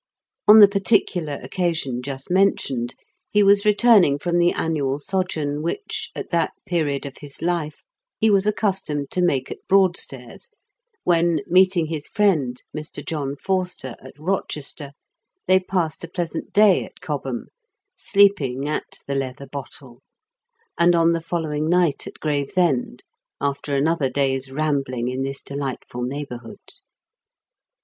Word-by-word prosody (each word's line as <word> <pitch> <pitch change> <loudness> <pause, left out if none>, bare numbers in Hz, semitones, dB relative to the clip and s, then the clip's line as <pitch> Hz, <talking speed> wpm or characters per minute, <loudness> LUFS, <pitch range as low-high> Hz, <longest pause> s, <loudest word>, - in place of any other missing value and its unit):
On 215 +1 +10
the 205 - +11
particular 195 -6 +1
occasion 160 -9 -1
just 135 +3 -6
mentioned, 140 -11 +1 0.3
he 210 0 +3
was 200 +1 +5
returning 210 -8 +5
from 175 +3 0
the 175 0 +4
annual 145 -4 -1
sojourn 155 -3 -2
which, 170 - -4
at - - -6
that 170 -2 +1
period 150 -5 -1
of 140 - -8
his 145 -2 -9
life, 165 -2 -2 0.4
he 220 -1 +4
was 200 0 +3
accustomed 190 -9 -1
to 180 - 0
make 135 -7 +1
at - - -6
Broadstairs, 195 - 0 0.5
when, 170 -3 +2
meeting 185 -1 +4
his 155 -2 -5
friend, 155 - +1
Mr. 155 0 -5
John 145 -3 -3
Forster, 180 -7 -2
at 130 0 -13
Eochester, 150 -3 -4 0.5
they 185 0 +5
passed 180 -4 -2
a - - -5
pleasant 175 -1 -4
day 210 -2 +5
at - - -13
Cobham, 140 -7 -4 0.4
sleeping 155 - +2
at 155 - -4
The 140 - -3
Leather 135 0 -3
Bottle, 135 -2 -9 0.8
and 175 +1 +5
on 165 0 +4
the 165 0 0
following 160 -2 -2
night 175 -5 +2
at - - -10
Gravesend, 145 -3 0 0.4
after 140 0 -2
another 145 0 +1
day's 135 0 0
rambling 135 -4 -1
in 130 +1 -3
this 135 +1 -4
delightful 135 -3 -5
neighbourhood. 125 -2 -5
155 Hz, 135 wpm, -22 LUFS, 140-180 Hz, 0.8 s, the